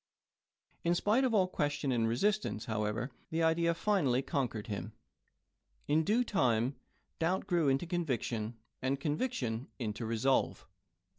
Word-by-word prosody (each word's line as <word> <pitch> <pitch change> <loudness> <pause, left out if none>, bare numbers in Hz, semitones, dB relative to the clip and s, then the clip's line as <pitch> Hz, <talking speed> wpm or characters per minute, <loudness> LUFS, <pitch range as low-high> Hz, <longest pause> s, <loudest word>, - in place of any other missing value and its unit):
In 170 +1 +3
spite 215 +8 +3
of 255 - +2
all 190 -3 +4
question 145 -5 -1
and 115 -2 +2
resist 210 - +2
ance, 105 - -4
however, 110 +3 -2 0.2
the 165 +1 0
idea 170 +1 +3
finally 150 -11 +2
conquered 125 - -2
him. 105 -2 -5 0.9
In 155 +2 +3
due 220 +9 +3
time, 125 - +1 0.4
doubt 180 +4 +1
grew 170 -5 +2
into 135 +4 +2
conviction, 120 -9 -2 0.2
and 135 +1 0
conviction 140 - -1
into 110 -1 -3
resolve. 115 +4 +1
140 Hz, 135 wpm, -33 LUFS, 115-175 Hz, 0.9 s, all